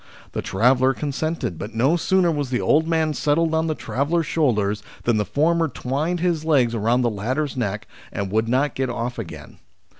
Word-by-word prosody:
The - - -3
traveller 125 +6 +2
consented, 150 - -3
but 105 +3 -7
no 135 +9 +3
sooner 180 0 +2
was 145 -4 -2
the 125 -1 0
old 160 +2 +2
man 160 -2 +1
settled 150 +5 +1
on 160 0 +1
the 155 - -1
traveller's 155 +6 -1
shoulders 105 -11 +1 0.2
than 115 -2 +2
the 105 - 0
former 165 +5 +2
twined 145 +7 -2
his 170 -3 0
legs 135 -7 +3
round 115 +3 +1
the 120 - +2
latter's 130 +8 -2
neck, 105 -4 -3 0.2
and 100 -1 -4
would 110 +2 +1
not 135 +4 +1
get 130 -1 -2
off 120 0 -3
again. 100 -7 -9
135 Hz, 185 wpm, -22 LUFS, 115-160 Hz, 0.2 s, no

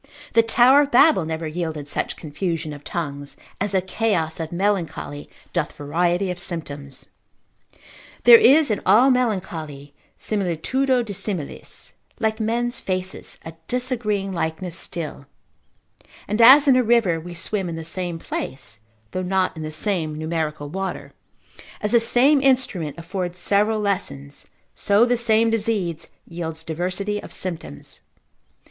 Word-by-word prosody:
The 230 - +6
tower 245 +5 +5
of 285 - 0
Babel 250 - +5
never 160 0 -3
yielded 155 -2 -4
such - - -2
confusion 160 0 -4
of 145 0 -11
tongues, 145 -4 -5 0.2
as 205 0 -1
the 190 -1 +2
chaos 185 -6 -1
of 160 -1 -4
melancholy 175 -6 -2 0.2
doth - - -1
variety 175 +5 0
of 180 - -6
symptoms. 145 -6 -5 1.1
There 470 -1 +10
is 305 - +5
in 210 - -1
all 255 +5 +5
melancholy 165 - -2 0.2
similitudo 230 - 0
dissimilis, 195 -6 -6 0.3
like 220 0 0
men's 240 +2 -1
faces, 185 0 -4
a 160 - -7
disagreeing 225 -6 -2
likeness 170 +1 -3
still; 155 -5 -5 1.0
and 210 +3 0
as 275 +5 +9
in 265 - +6
a 255 - +5
river 225 -8 +2
we 175 +2 -9
swim 190 +1 -2
in 165 - -4
the 165 0 -6
same 175 0 -2
place, 120 -8 -6 0.3
though 185 - -2
not 185 0 0
in 160 - -7
the 155 - -4
same 155 -1 -2
numerical 155 -2 -3
water; 190 +5 -5 0.7
as 210 - -1
the 235 - +6
same 265 +5 +4
instrument 250 - +1
affords 175 +1 -4
several 210 +4 +2
lessons, 185 -9 -3 0.3
so 205 +3 +3
the 245 0 +2
same 225 -1 +3
disease 205 -7 -1 0.2
yields 165 -2 -6
diversity 185 +6 -3
of - - -11
symptoms. 165 - -7
185 Hz, 140 wpm, -22 LUFS, 160-225 Hz, 1.1 s, There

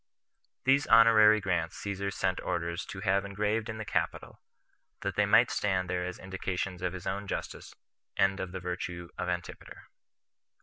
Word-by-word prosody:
These 135 +2 +3
honorary 110 -2 +7
grants 90 -4 -1
Caesar 100 -1 -3
sent 95 -1 -1
orders 85 +1 -3
to 95 - -7
have 100 -1 +2
engraved 105 +3 -1
in 110 - -4
the 110 - -5
Capitol, - - -3 0.6
that - - -3
they - - +2
might - - +5
stand 95 -3 0
there 90 -1 -1
as 90 0 -5
indications 95 -1 -4
of 90 -1 -2
his 90 -2 -8
own 100 +1 -3
justice, - - -6 0.4
and 95 0 +2
of 95 - -4
the 95 - -5
virtue 90 -1 -5
of 90 - -2
Antipater. 90 0 -6
95 Hz, 165 wpm, -30 LUFS, 90-105 Hz, 0.6 s, honorary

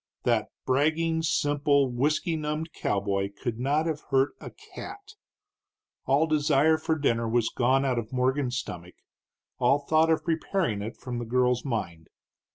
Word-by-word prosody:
That - - +1 0.2
bragging, 160 +5 +1
simple, 145 -2 +2
whisky 150 +6 0
numbed 155 +1 -3
cowboy 100 0 -1
could 120 -3 -3
not 145 +5 +1
have 155 -2 -2
hurt 135 +1 +2
a - - -7
cat. 405 +1 -11 0.9
All 140 +4 +4
desire 155 0 +3
for 160 - 0
dinner 115 -6 0
was 115 -1 +1
gone 130 +3 +2
out 125 -3 +1
of 115 -1 -7
Morgan's 130 0 0
stomach, 90 -7 -7 0.6
all 125 +3 +4
thought 155 +3 +2
of 160 - +2
preparing 160 - -1
it 110 +3 -6
from 125 -2 -5
the 120 - -4
girl's 125 +1 +1
mind. 85 - -4
135 Hz, 150 wpm, -27 LUFS, 120-155 Hz, 0.9 s, All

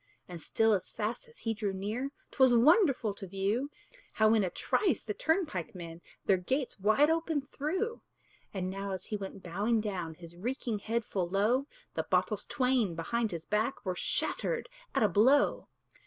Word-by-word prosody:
And 175 -2 -8
still, 225 +5 +2
as 190 - -1
fast 225 - -3
as 465 - -16
he 225 - -2
drew 205 -2 -2
near, 215 +8 -3 0.2
'Twas 260 -3 +5
wonderful 270 - +4
to 195 -1 -8
view, 200 +9 -1 0.4
How 220 0 +4
in 220 -2 +4
a 185 - 0
trice 340 - 0
the 210 - -3
turnpike 310 - -1
men 170 -1 -8 0.2
Their 195 - +4
gates 255 +7 -2
wide 220 +10 +4
open 325 -2 0
threw. 365 - -3 0.5
And 185 -2 -3
now, 195 0 -4
as 190 -1 -5
he 215 - -3
went 195 -1 -6
bowing 205 +7 +1
down 185 -7 -3
His 170 0 -12
reeking 230 +2 -3
head 225 +2 -1
full 180 -3 -2
low, 220 +9 +2 0.3
The - - 0
bottles - - +1
twain 250 -8 +1
behind 225 +7 -1
his 170 -3 -6
back 215 +5 -1
Were 185 -1 -1
shattered - - -1 0.3
at - - +3
a - - +6
blow. 235 +10 +4
215 Hz, 175 wpm, -31 LUFS, 190-265 Hz, 0.5 s, a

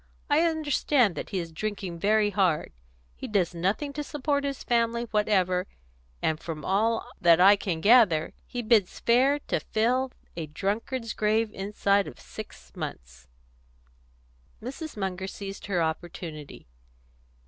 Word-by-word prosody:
I 295 +2 +5
understand 295 - +2
that - - -6
he 195 - -3
is 170 -2 -4
drinking 190 -1 -4
very 210 +2 +3
hard. 185 -7 +1 0.4
He - - -7
does 190 -5 +1
nothing 195 - -1
to 295 +1 -3
support 285 0 -1
his 280 -1 -3
family 235 -1 +1
whatever, 190 -3 +2 0.6
and 160 -1 +1
from 160 -3 -6
all 220 +4 +1
that 170 -1 +6
I 195 +3 +8
can 180 -5 -3
gather, 205 -8 +5
he 245 -1 -4
bids 215 -5 +2
fair 260 +5 +4
to - - -1
fill 250 +4 0 0.2
a 165 -2 -4
drunkard's 220 - -3
grave 215 +1 +1
inside 200 0 +1
of - - -10
six - - -11
months." 60 0 -7 1.3
Mrs. 275 +4 -7
Munger 190 -1 -3
seized 195 +1 -7
her 180 -4 +1
opportunity. 160 -2 -5
205 Hz, 135 wpm, -27 LUFS, 175-235 Hz, 1.3 s, I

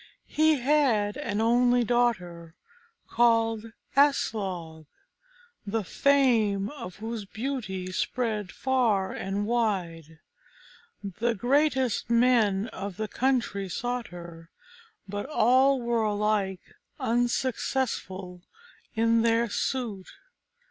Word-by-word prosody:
He 310 0 +4
had 250 -7 +2
an 220 -7 -2
only 245 +1 +3
daughter, 180 -9 -1 0.5
called 230 -1 +2 0.2
Aslog, 190 - 0 0.8
the 215 +1 -2
fame 225 -6 +2
of 235 -11 -8
whose 220 0 -5
beauty 215 -5 -4
spread 215 -2 -2
far 235 -8 +1
and 195 +2 -3
wide. 180 -9 -2 0.9
The 225 +4 -2
greatest 265 0 +1
men 230 -4 +3
of 200 -3 -7
the 215 - -2
country 235 -6 -1
sought 245 +5 -3
her, 170 -2 -11 0.6
but 205 +4 -5
all 265 0 +4
were 235 -1 0
alike 205 -3 -1 0.3
unsuccessful 235 -6 -1 0.5
in 230 +1 +3
their 230 -1 +2
suit. 225 -9 -3
225 Hz, 95 wpm, -27 LUFS, 195-245 Hz, 0.9 s, He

